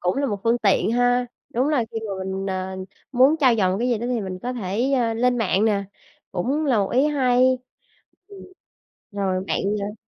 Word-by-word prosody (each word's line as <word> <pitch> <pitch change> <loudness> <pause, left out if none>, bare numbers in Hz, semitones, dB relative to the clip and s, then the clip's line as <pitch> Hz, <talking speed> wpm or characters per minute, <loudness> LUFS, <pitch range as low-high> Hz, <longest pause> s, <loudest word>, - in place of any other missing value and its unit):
Cũng 180 +5 0
là 280 0 0
một 205 -4 -3
phương 230 +1 +3
tiện 205 +2 +2
ha, 245 0 +2 0.3
đúng 255 +5 +1
là 270 -7 +1
khi 225 - -2
mà - - -3
mình, 190 +1 -4
ờ, 190 0 -3 0.4
muốn 265 +5 +5
trau 255 -4 +5
dồi 185 -3 +2
một - - -1
cái 245 +2 0
gì 235 -3 +1
đó 240 - -4
thì 245 -3 -1
mình 185 -2 -5
có 250 +1 -3
thể, 235 +4 -1
ơ, 235 -4 +1
lên 245 +1 +1
mạng 205 -1 +1
nè, 200 -2 +1 0.5
cũng 270 - -1
là 245 -6 +3
một 195 - 0
ý 265 +4 +3
hay. 255 -3 +3 0.7
Ừm. 400 -1 -12 0.7
Rồi 190 -2 -1
bạn, - - 0 0.2
ờ 205 +1 -4
235 Hz, 215 wpm, -23 LUFS, 195-255 Hz, 0.7 s, muốn